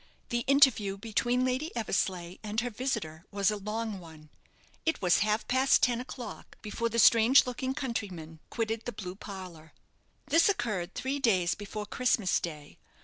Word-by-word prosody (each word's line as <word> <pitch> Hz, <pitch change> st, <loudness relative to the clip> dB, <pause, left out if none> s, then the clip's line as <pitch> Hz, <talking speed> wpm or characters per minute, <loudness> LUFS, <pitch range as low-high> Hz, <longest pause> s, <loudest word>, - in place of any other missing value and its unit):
The 240 Hz, -, 0 dB
interview 260 Hz, -8 st, +4 dB
between 240 Hz, +4 st, 0 dB
Lady 260 Hz, +6 st, -1 dB
Eversleigh 185 Hz, -5 st, -1 dB
and 215 Hz, 0 st, -2 dB
her 245 Hz, +1 st, -3 dB
visitor 210 Hz, -10 st, -3 dB
was 200 Hz, -1 st, +1 dB
a -, -, -2 dB
long 210 Hz, 0 st, -4 dB
one. 160 Hz, -3 st, -14 dB, 0.5 s
It 320 Hz, -, 0 dB
was 180 Hz, -2 st, +3 dB
half 215 Hz, +2 st, 0 dB
past 260 Hz, +1 st, +3 dB
ten 245 Hz, -1 st, +2 dB
o'clock 250 Hz, -1 st, -9 dB
before 230 Hz, +2 st, -2 dB
the 230 Hz, -, -3 dB
strange 230 Hz, +3 st, +6 dB
looking 260 Hz, +1 st, -3 dB
countryman 180 Hz, -, -5 dB
quitted 225 Hz, -1 st, -2 dB
the 245 Hz, -, -4 dB
blue 185 Hz, -3 st, -6 dB
parlour. 185 Hz, -5 st, -10 dB, 0.5 s
This 330 Hz, +6 st, +4 dB
occurred 200 Hz, -, -2 dB
three 270 Hz, +2 st, -2 dB
days 185 Hz, -9 st, +2 dB
before 210 Hz, +1 st, -6 dB
Christmas 220 Hz, -3 st, +1 dB
day. 150 Hz, -4 st, -8 dB
215 Hz, 155 wpm, -29 LUFS, 185-245 Hz, 0.5 s, strange